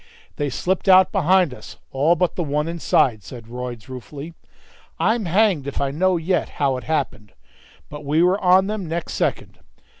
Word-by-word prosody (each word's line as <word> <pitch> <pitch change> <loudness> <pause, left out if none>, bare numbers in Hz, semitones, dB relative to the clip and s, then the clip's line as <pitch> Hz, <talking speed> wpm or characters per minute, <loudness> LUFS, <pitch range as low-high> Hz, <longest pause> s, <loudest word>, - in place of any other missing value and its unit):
"They 145 -1 -1
slipped 185 +8 -1
out 185 0 +6
behind 185 -5 +3
us, - - -12
all 150 +6 +2
but 180 +1 0
the - - -2
one 150 +1 -1
inside," 135 -9 +1
said 120 -3 -10
Royds, 120 -1 -7
ruefully; 140 +5 -9 0.6
"I'm 220 -1 +1
hanged 180 -5 +2
if 140 - -4
I 140 -1 -1
know 185 +5 +1
yet 170 +2 -1
how 140 -2 +1
it 125 - -9
happened 120 -10 -3 0.5
but 150 0 -9
we 150 +4 +2
were 185 +3 +3
on 185 +1 +5
them 205 -3 -4
next 165 +1 -4
second. - - -2
160 Hz, 175 wpm, -21 LUFS, 140-185 Hz, 0.6 s, out